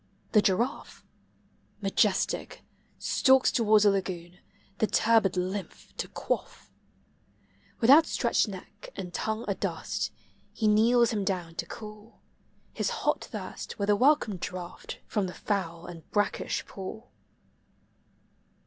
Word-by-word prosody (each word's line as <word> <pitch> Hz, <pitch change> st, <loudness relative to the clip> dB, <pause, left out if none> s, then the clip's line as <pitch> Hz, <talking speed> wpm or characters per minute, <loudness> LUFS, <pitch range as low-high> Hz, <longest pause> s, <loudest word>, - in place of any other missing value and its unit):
The 210 Hz, -, +6 dB
giraffe, 220 Hz, +7 st, -1 dB, 0.7 s
Majestic, -, -, 0 dB, 0.3 s
stalks 265 Hz, -1 st, +4 dB
towards 215 Hz, -3 st, +4 dB
the 205 Hz, -, +6 dB
lagoon, 180 Hz, -2 st, -4 dB, 0.4 s
the 220 Hz, -, +3 dB
turbid 215 Hz, -5 st, +3 dB
lymph 185 Hz, +2 st, -4 dB
to -, -, -3 dB
quaff; -, -, -4 dB, 1.1 s
With 235 Hz, +3 st, +5 dB
outstretched 275 Hz, -6 st, +4 dB
neck 200 Hz, +1 st, -10 dB
and 180 Hz, -2 st, -6 dB
tongue 220 Hz, +3 st, -2 dB
adust, -, -, -2 dB, 0.4 s
he 220 Hz, -, 0 dB
kneels 230 Hz, +3 st, +4 dB
him 210 Hz, -3 st, -1 dB
down 180 Hz, -4 st, -2 dB
to -, -, -4 dB
cool 215 Hz, 0 st, -10 dB, 0.5 s
His -, -, -1 dB, 0.2 s
hot -, -, +1 dB
thirst -, -, -7 dB
with 205 Hz, -1 st, +1 dB
a -, -, +5 dB
welcome 255 Hz, -4 st, +3 dB
draught 180 Hz, 0 st, -6 dB
from 205 Hz, -3 st, -1 dB
the 180 Hz, -, -8 dB
foul 175 Hz, -5 st, -2 dB
and 170 Hz, -3 st, -10 dB
brackish 205 Hz, -1 st, -1 dB
pool. 205 Hz, +5 st, -8 dB
205 Hz, 120 wpm, -28 LUFS, 185-225 Hz, 1.1 s, The